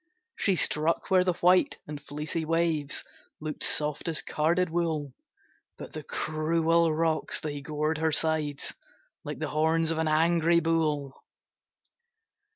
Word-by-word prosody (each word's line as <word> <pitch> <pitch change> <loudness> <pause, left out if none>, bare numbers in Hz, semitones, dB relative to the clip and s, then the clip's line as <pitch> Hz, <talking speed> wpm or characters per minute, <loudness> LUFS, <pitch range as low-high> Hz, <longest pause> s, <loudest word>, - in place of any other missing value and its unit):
She 195 - +1
struck 160 +2 0
where 185 -1 +5
the 180 -2 0
white 180 +1 +4
and 150 -1 -7
fleecy 150 +3 -4
waves 160 -3 0 0.4
Look'd 155 -1 -6
soft 150 +1 +1
as 160 -1 0
carded 170 +3 +1
wool, 160 -5 -1 0.6
But - - -9
the - - -5
cruel 165 +1 +1
rocks, 160 0 0
they 145 -2 -5
gored 155 +2 -2
her 160 0 +1
sides 155 -2 0 0.5
Like 150 -2 -5
the 155 -1 -3
horns 160 +1 +2
of 160 - -1
an 160 - +1
angry 165 +2 +3
bull. 155 -4 -1
160 Hz, 135 wpm, -28 LUFS, 150-165 Hz, 0.6 s, where